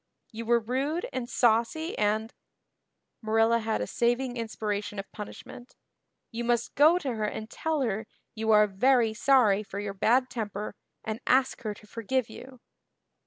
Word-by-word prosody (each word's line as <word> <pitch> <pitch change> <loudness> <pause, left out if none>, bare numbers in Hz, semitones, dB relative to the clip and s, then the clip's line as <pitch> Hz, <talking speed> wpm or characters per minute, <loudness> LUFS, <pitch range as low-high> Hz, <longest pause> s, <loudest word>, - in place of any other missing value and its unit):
You 225 +1 -7
were 235 0 +4
rude 270 +9 -2
and 250 -2 -3
saucy 240 +8 +1
and" 215 +2 0 0.9
Marilla 225 +1 +3
had 220 -1 -1
a - - -1
saving 245 +1 0
inspiration 210 -3 -3
of 195 - -6
punishment 240 +3 -10 0.6
"you 235 0 -4
must 240 0 0
go 310 +5 +6
to 275 -8 -3
her 215 -2 -2
and 215 +1 -4
tell 320 -2 -1
her 220 -3 -2 0.3
you 220 0 -3
are 210 -1 +7
very 225 +3 +2
sorry 220 -4 +4
for 200 -1 -7
your 205 -1 -4
bad 245 +6 +3
temper 210 -4 -4 0.3
and 220 +1 -4
ask 260 +1 +2
her 215 -2 -4
to 210 - -16
forgive 230 +3 -2
you." 255 -1 -12
230 Hz, 160 wpm, -28 LUFS, 215-255 Hz, 0.9 s, are